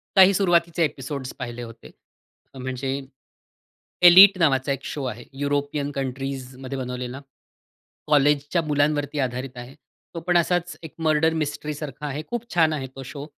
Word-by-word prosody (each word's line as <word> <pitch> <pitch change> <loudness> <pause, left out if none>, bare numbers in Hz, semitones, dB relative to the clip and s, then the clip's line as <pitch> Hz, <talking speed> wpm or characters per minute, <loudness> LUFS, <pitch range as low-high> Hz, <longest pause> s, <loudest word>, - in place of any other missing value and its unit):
काही 190 0 +7
सुरुवातीचे 170 -3 +2
एपिसोड्स 135 -2 -4
पाहिले 120 -1 -6
होते. 115 -1 -12 0.6
म्हणजे 130 +1 -3 1.1
एलीट 190 +2 +9
नावाचा 140 -4 +2
एक 135 0 -3
शो 145 - -4
आहे 120 -1 -6 0.2
युरोपियन 145 0 -1
कंट्रीजमध्ये 135 0 -5
बनवलेला. 125 +1 -5 0.9
कॉलेजच्या 145 +2 +3
मुलांवरती 145 0 0
आधारित 125 0 -3
आहे. 125 +3 -9 0.4
तो 165 - -3
पण 175 -1 +4
असाच 175 +1 0
एक 160 - -9
मर्डर 160 0 +2
मिस्ट्रीसारखा 150 -2 -4
आहे. 145 +2 -4
खूप 240 0 -5
छान 160 -2 +4
आहे 135 -3 -4
तो 135 - -7
शो 140 +2 -8
145 Hz, 135 wpm, -24 LUFS, 130-160 Hz, 1.1 s, एलीट